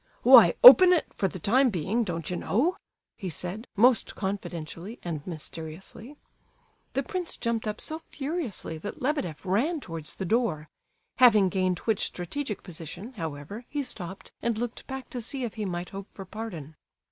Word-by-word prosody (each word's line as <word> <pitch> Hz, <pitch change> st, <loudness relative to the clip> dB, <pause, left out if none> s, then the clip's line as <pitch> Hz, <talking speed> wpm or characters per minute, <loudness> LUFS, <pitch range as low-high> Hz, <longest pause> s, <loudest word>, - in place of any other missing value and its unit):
"Why, -, -, +8 dB
open 370 Hz, -7 st, +11 dB
it, 340 Hz, -, 0 dB
for 195 Hz, -, 0 dB
the 190 Hz, -, -7 dB
time 250 Hz, -, +3 dB
being, 200 Hz, +5 st, 0 dB
don't 170 Hz, -5 st, -4 dB
you 180 Hz, -, -2 dB
know?" 270 Hz, -, +1 dB, 0.4 s
he 190 Hz, -4 st, -5 dB
said, 180 Hz, +7 st, -5 dB
most 240 Hz, +3 st, +3 dB
confidentially 190 Hz, +1 st, -5 dB
and 165 Hz, -4 st, -4 dB
mysteriously. 170 Hz, -, -8 dB, 0.8 s
The -, -, 0 dB
prince 365 Hz, -4 st, -4 dB
jumped 230 Hz, -1 st, -2 dB
up 210 Hz, 0 st, -3 dB
so 315 Hz, +1 st, -3 dB
furiously 275 Hz, -, -4 dB
that 205 Hz, -, -7 dB
Lebedeff 250 Hz, -, -2 dB
ran 255 Hz, -, +1 dB
towards 165 Hz, -, -7 dB
the 190 Hz, -, -4 dB
door; 175 Hz, -8 st, 0 dB, 0.5 s
having 215 Hz, -7 st, +6 dB
gained 185 Hz, -1 st, 0 dB
which 220 Hz, -3 st, +1 dB
strategic 210 Hz, +5 st, -4 dB
position, 175 Hz, -, -8 dB
however, 165 Hz, -, -6 dB
he 290 Hz, -1 st, -2 dB
stopped 190 Hz, -7 st, -7 dB
and 230 Hz, -2 st, 0 dB
looked 240 Hz, +1 st, -5 dB
back 265 Hz, -1 st, -6 dB
to 245 Hz, -, -4 dB
see 260 Hz, +3 st, -5 dB
if 235 Hz, -, -3 dB
he 215 Hz, -, -4 dB
might 175 Hz, -1 st, -4 dB
hope 195 Hz, 0 st, -7 dB
for 195 Hz, -, -8 dB
pardon. 185 Hz, -8 st, -7 dB
205 Hz, 165 wpm, -27 LUFS, 175-250 Hz, 0.8 s, open